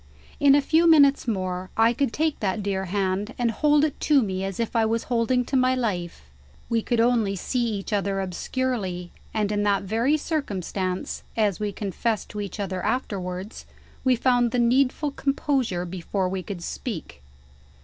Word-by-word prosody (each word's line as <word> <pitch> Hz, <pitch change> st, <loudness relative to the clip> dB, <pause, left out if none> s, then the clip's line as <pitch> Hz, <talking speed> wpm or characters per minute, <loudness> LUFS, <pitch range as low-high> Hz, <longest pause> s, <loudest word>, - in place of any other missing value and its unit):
In 280 Hz, -1 st, +6 dB
a 290 Hz, -, +3 dB
few 330 Hz, +3 st, +4 dB
minutes 285 Hz, -4 st, +5 dB
more, 185 Hz, -3 st, -2 dB
I 225 Hz, +1 st, +5 dB
could 275 Hz, -1 st, 0 dB
take 310 Hz, +2 st, 0 dB
that 200 Hz, 0 st, -1 dB
dear 195 Hz, -1 st, -1 dB
hand, 195 Hz, +3 st, -1 dB
and 240 Hz, -2 st, +1 dB
hold 295 Hz, +5 st, +3 dB
it 305 Hz, -, -4 dB
to 285 Hz, -4 st, +4 dB
me 190 Hz, -2 st, -2 dB
as 195 Hz, +1 st, -4 dB
if 230 Hz, +1 st, -2 dB
I 225 Hz, -, +4 dB
was 225 Hz, +1 st, 0 dB
holding 245 Hz, +2 st, +2 dB
to 270 Hz, -, -3 dB
my 255 Hz, 0 st, +3 dB
life. 180 Hz, -, -3 dB, 0.5 s
We 230 Hz, -1 st, +1 dB
could 240 Hz, +1 st, 0 dB
only 230 Hz, -4 st, +2 dB
see 240 Hz, +5 st, -1 dB
each 200 Hz, +2 st, -4 dB
other 200 Hz, -1 st, 0 dB
obscurely, 190 Hz, -1 st, -3 dB, 0.2 s
and 210 Hz, -2 st, 0 dB
in 205 Hz, 0 st, 0 dB
that 205 Hz, -1 st, +2 dB
very 230 Hz, +9 st, +1 dB
circumstance 195 Hz, -, -3 dB, 0.2 s
(as 210 Hz, -4 st, +1 dB
we 210 Hz, -1 st, -1 dB
confessed 210 Hz, +2 st, -2 dB
to 210 Hz, -, -5 dB
each 200 Hz, +1 st, -6 dB
other 190 Hz, -2 st, -3 dB
afterwards) 190 Hz, -4 st, -3 dB, 0.4 s
we 255 Hz, -1 st, +4 dB
found 245 Hz, 0 st, +2 dB
the 250 Hz, -, -2 dB
needful 260 Hz, +4 st, +2 dB
composure 275 Hz, -10 st, 0 dB
before 185 Hz, +2 st, -2 dB
we 190 Hz, 0 st, -3 dB
could 180 Hz, -2 st, -7 dB
speak. 65 Hz, -, -6 dB
220 Hz, 175 wpm, -25 LUFS, 190-255 Hz, 0.5 s, In